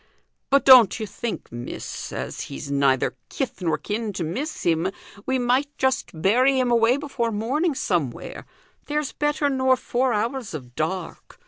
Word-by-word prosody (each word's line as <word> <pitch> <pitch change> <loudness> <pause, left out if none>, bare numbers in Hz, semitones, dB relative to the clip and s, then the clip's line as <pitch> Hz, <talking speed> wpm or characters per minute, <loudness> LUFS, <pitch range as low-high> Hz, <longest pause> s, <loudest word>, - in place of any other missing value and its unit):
But 275 0 +3
don't 250 -4 +8
you 220 - -2
think, 215 +3 -5
miss, 120 +1 -6
as - - -5
he's 105 - -6
neither 140 -2 +2 0.2
kith 265 -8 -4
nor 165 -3 +1
kin 210 0 -3
to 180 - -3
miss 265 - -4
him, 170 +2 +1 0.4
we 260 0 +2
might 255 +3 +1
just 265 0 0
bury 255 +9 +3
him 250 -1 +1
away 235 +2 +4
before 270 -5 -2
morning, 270 +10 0
somewhere? 165 - -2 0.4
There's 300 -1 -1
better 295 0 0
nor 260 -1 +2
four 250 +1 0
hours 230 - -2
of 125 -5 -9
dark. 165 +7 -4
235 Hz, 155 wpm, -24 LUFS, 180-265 Hz, 0.4 s, don't